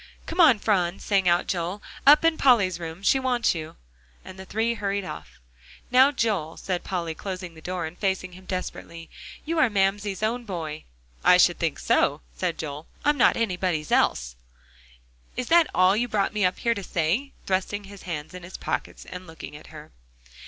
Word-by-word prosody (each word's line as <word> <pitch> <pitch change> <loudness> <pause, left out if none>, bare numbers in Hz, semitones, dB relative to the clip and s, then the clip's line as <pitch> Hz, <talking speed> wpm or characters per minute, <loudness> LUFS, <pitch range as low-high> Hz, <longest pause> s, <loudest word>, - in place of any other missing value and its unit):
"Come 345 +2 +1
on, 275 -10 +7
Phron," 190 -4 +1
sang 195 -3 +2
out 175 +1 +3
Joel, 180 +2 -2 0.3
"up 300 +3 +8
in 330 -1 +4
Polly's 205 - +3
room 165 +2 -7
she 270 - +4
wants 250 -2 +1
you," 155 -2 -7 0.5
and 190 - -10
the 190 - -8
three 225 +4 0
hurried 200 -2 -2
off. 80 - -9 0.5
"Now, 260 +3 +6
Joel," 205 - -1
said 180 -2 -3
Polly, 170 -3 -3
closing 185 0 -6
the 160 - -14
door 180 +1 -3
and 160 +2 -7
facing 190 -1 -1
him 185 +1 -14
desperately, 170 -2 -6 0.3
"you 330 +1 -1
are 265 - +5
Mamsie's 200 0 0
own 240 +3 0
boy." 165 -7 -5 0.4
"I - - +7
should - - +4
think - - -1
so," - - +2
said 165 - -2
Joel, 150 0 -6 0.2
"I'm 295 -1 +3
not - - +5
anybody's 180 -7 -1
else. - - +2 1.0
Is 250 - -3
that 335 -1 +6
all 185 +2 +4
you 240 +3 0
brought 205 -4 0
me 210 -3 +1
up 180 - +1
here 235 - +1
to 200 - -5
say?" 185 - -1
thrusting 195 +2 -1
his 200 0 -12
hands 160 -2 -6
in 180 - -8
his 175 +2 -9
pockets - - -4
and 185 0 -9
looking 160 -2 -10
at 150 - -12
her. 155 -1 -12
190 Hz, 190 wpm, -25 LUFS, 170-225 Hz, 1.0 s, up